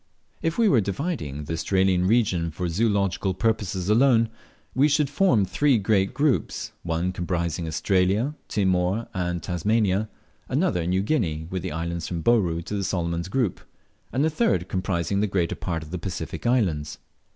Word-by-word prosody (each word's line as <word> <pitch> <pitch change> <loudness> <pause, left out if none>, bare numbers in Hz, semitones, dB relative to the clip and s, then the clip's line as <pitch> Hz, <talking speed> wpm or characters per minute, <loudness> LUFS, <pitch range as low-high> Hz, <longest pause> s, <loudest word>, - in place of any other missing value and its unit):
If 165 0 -1
we 230 -2 +4
were 130 - +4
dividing 95 - -3
the 80 - -4
Australian 95 +2 +2
region 95 -7 +2
for 85 +3 -3
zoological 100 -1 0
purposes 95 -3 -1
alone, 115 +1 +4 0.4
we 135 +3 +4
should 145 -1 +1
form 135 - +3
three 135 +7 +2
great 100 -2 +2
groups: 145 -3 0
one 85 +2 -1
comprising 85 -2 -2
Australia, 95 - +1
Timor, 95 +2 +1
and 90 -3 -2
Tasmania; 100 +3 +1 0.4
another 85 -1 +1
New 95 +2 +1
Guinea, 85 - 0
with 95 -1 -2
the - - -4
islands 85 +1 -3
from 85 -2 -4
Bouru 90 -8 +2
to 95 - -6
the 100 - -1
Solomon's 85 -3 -2
group; 110 -2 -1 0.5
and 135 - +1
the 160 - +1
third 95 - +1
comprising 95 0 -1
the 105 - +2
greater 90 -4 0
part 85 -3 -3
of 80 - -12
the 90 - -3
Pacific 90 +4 -4
Islands. 85 -12 +1
95 Hz, 160 wpm, -25 LUFS, 85-115 Hz, 0.5 s, we